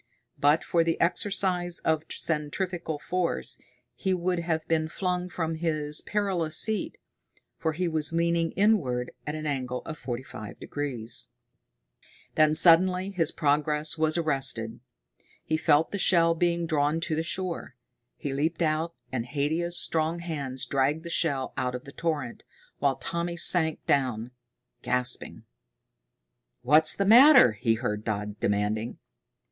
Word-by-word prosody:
But 145 Hz, +3 st, +3 dB
for 170 Hz, -1 st, +2 dB
the 165 Hz, 0 st, -1 dB
exercise 180 Hz, -1 st, 0 dB
of 160 Hz, -1 st, +1 dB
centrifugal 165 Hz, +1 st, -3 dB
force 180 Hz, +3 st, -2 dB, 0.3 s
he 190 Hz, -1 st, -1 dB
would 180 Hz, 0 st, -1 dB
have 160 Hz, -2 st, -2 dB
been 160 Hz, -1 st, +1 dB
flung 180 Hz, 0 st, -2 dB
from 165 Hz, -2 st, -3 dB
his 155 Hz, -2 st, 0 dB
perilous 185 Hz, -7 st, -1 dB
seat, 220 Hz, -1 st, 0 dB, 0.6 s
for 160 Hz, -1 st, -1 dB
he 180 Hz, +3 st, -1 dB
was 160 Hz, -2 st, 0 dB
leaning 170 Hz, 0 st, +1 dB
inward 155 Hz, -, +1 dB, 0.2 s
at 150 Hz, -, -3 dB
an 155 Hz, 0 st, -6 dB
angle 130 Hz, -4 st, -3 dB
of 155 Hz, -1 st, -7 dB
forty 125 Hz, 0 st, -5 dB
five 110 Hz, -5 st, -10 dB
degrees. 125 Hz, -6 st, -4 dB, 1.1 s
Then 155 Hz, 0 st, +4 dB
suddenly 180 Hz, +3 st, +5 dB
his 165 Hz, -4 st, 0 dB
progress 150 Hz, 0 st, 0 dB
was 155 Hz, 0 st, 0 dB
arrested. 135 Hz, -8 st, -1 dB, 0.6 s
He 155 Hz, -, -1 dB
felt 155 Hz, 0 st, +2 dB
the 200 Hz, -, -3 dB
shell 165 Hz, -3 st, +4 dB
being 170 Hz, 0 st, 0 dB
drawn 155 Hz, 0 st, +1 dB
to 160 Hz, -, -1 dB
the 160 Hz, -, 0 dB
shore. 170 Hz, -5 st, -4 dB, 0.4 s
He 140 Hz, -, -4 dB
leaped 160 Hz, +5 st, -1 dB
out, 160 Hz, +2 st, -1 dB, 0.2 s
and 125 Hz, -3 st, -2 dB
Haidia's 160 Hz, +5 st, -1 dB
strong 160 Hz, +1 st, 0 dB
hands 140 Hz, -6 st, -4 dB
dragged 140 Hz, +5 st, 0 dB
the 170 Hz, -, -7 dB
shell 140 Hz, -6 st, 0 dB
out 125 Hz, -2 st, -1 dB
of 125 Hz, -, -7 dB
the 140 Hz, -, -11 dB
torrent, 145 Hz, -7 st, -3 dB, 0.4 s
while 140 Hz, -1 st, +2 dB
Tommy 170 Hz, 0 st, -4 dB
sank 160 Hz, -2 st, +3 dB
down, 125 Hz, -4 st, 0 dB, 0.5 s
gasping. 125 Hz, 0 st, -2 dB, 1.2 s
"What's 155 Hz, +5 st, +6 dB
the 200 Hz, -, 0 dB
matter?" 250 Hz, -, +8 dB
he 115 Hz, +2 st, 0 dB
heard 105 Hz, -3 st, -3 dB
Dodd 105 Hz, -1 st, -4 dB
demanding. 105 Hz, +3 st, -1 dB
155 Hz, 140 wpm, -27 LUFS, 135-170 Hz, 1.2 s, matter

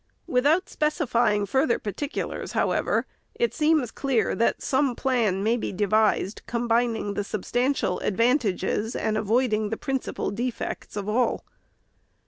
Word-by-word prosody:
Without 305 Hz, +4 st, +2 dB
specifying 240 Hz, -, +1 dB
further 265 Hz, +4 st, +2 dB
particulars, 275 Hz, -, -4 dB
however, -, -, +1 dB, 0.3 s
it 475 Hz, +1 st, 0 dB
seems 305 Hz, -6 st, +2 dB
clear 265 Hz, -5 st, 0 dB
that 230 Hz, -, 0 dB
some 265 Hz, -2 st, +1 dB
plan 230 Hz, -8 st, +1 dB
may 225 Hz, +3 st, +3 dB
be -, -, -3 dB
devised, 205 Hz, 0 st, +1 dB
combining 230 Hz, -3 st, 0 dB
the 205 Hz, -, -2 dB
substantial 240 Hz, 0 st, -1 dB
advantages 225 Hz, -1 st, 0 dB
and 215 Hz, -, -1 dB
avoiding 215 Hz, 0 st, +1 dB
the 225 Hz, -, -3 dB
principal 270 Hz, -6 st, -3 dB
defects 240 Hz, +1 st, -4 dB
of 205 Hz, -1 st, -4 dB
all. 240 Hz, +4 st, 0 dB
235 Hz, 120 wpm, -25 LUFS, 210-265 Hz, 0.3 s, may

